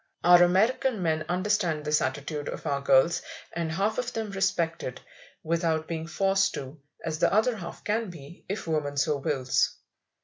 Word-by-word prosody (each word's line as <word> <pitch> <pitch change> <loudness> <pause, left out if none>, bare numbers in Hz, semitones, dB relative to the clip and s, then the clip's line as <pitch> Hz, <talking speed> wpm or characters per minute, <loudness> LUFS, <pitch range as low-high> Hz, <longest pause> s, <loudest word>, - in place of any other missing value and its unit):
Our 175 0 +8
American 210 +5 +3
men 155 -2 0
understand 180 -4 0
this 150 0 +2
attitude 145 +2 -3
of - - -7
our 140 -1 0
girls, 135 +4 +4 0.3
and 165 -1 -2
half 200 +8 0
of 250 0 -2
them 220 -2 -3
respect 190 -4 0
it, 125 - -5 0.4
without 165 -1 0
being 165 -1 -4
forced 195 +3 +1
to, 135 +3 -7 0.3
as 155 -2 -3
the - - +3
other 220 +4 +3
half 175 -5 -8
can 220 0 -1
be, 165 -1 -12
if 200 - -3
woman 150 -3 -1
so 140 +2 +2
wills. 135 -2 0
165 Hz, 170 wpm, -27 LUFS, 150-195 Hz, 0.4 s, Our